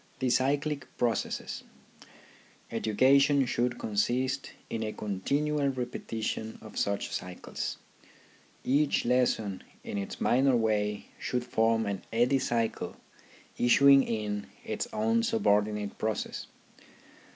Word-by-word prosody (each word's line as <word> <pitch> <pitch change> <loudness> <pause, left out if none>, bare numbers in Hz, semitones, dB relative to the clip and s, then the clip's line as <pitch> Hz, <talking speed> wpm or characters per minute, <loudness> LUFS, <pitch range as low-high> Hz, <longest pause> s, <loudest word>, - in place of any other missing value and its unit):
THE 130 -1 0
CYCLIC 140 +3 +1
PROCESSES 115 -3 -1 1.1
Education 135 +5 +4
should 120 0 0
consist 125 +6 0 0.2
in 115 - -3
a 110 -1 -2
continual 140 +9 0
repeti 125 -3 -4
tion 110 0 -3
of 110 - -12
such 100 0 -1
cycles. 90 0 -5 0.9
Each 140 +2 +2
lesson 120 -5 +1 0.2
in 100 - -4
its 100 - -5
minor 130 +1 +3
way 105 -2 0
should 125 -1 -1
forrji 115 -2 +1
an 100 -2 -2
eddy 120 +4 +3
cycle 115 -3 -1 0.6
issuing 135 +3 +7
in 105 -4 -2 0.2
its 230 - -2
own 225 +1 +2
subordinate 105 - +1
process. 110 -1 -2
120 Hz, 105 wpm, -29 LUFS, 105-140 Hz, 1.1 s, issuing